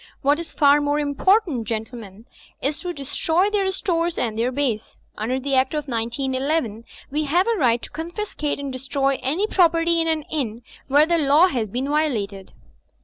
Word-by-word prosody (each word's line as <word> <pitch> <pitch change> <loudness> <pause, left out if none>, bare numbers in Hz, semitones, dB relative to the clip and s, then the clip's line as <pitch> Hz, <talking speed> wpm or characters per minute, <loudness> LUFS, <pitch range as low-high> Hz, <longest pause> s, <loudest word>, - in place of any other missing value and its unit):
What 285 +3 +3
is 335 - -7
far 285 0 +4
more 290 0 +1
important, 300 - +1
gentlemen, 220 -2 -6 0.3
is 285 +3 -2
to 360 - -4
destroy 325 +6 0
their 395 -2 +1
stores 345 -3 -1
and 225 -3 -1
their 235 +3 0
base. 250 -5 -2 0.2
Under 245 +5 -2
the 275 +1 -3
Act 260 +3 +2
of 300 -1 -3
191 265 +6 -1
1 225 +2 -13 0.3
we 300 +2 0
have 345 +6 +2
a 465 - +2
right 240 -3 +2
to - - -7
confiscate 330 -3 -4
and 280 -2 -5
destroy 270 +1 -1
any 320 +10 0
property 335 -4 +3
in 330 - -1
an 320 -2 0
inn 245 -7 -4 0.2
where 290 +3 +5
the 340 +1 +1
law 300 +5 +5
has 235 -7 -1
been 250 +7 -3
violated." 220 -11 -1
285 Hz, 180 wpm, -22 LUFS, 250-330 Hz, 0.3 s, where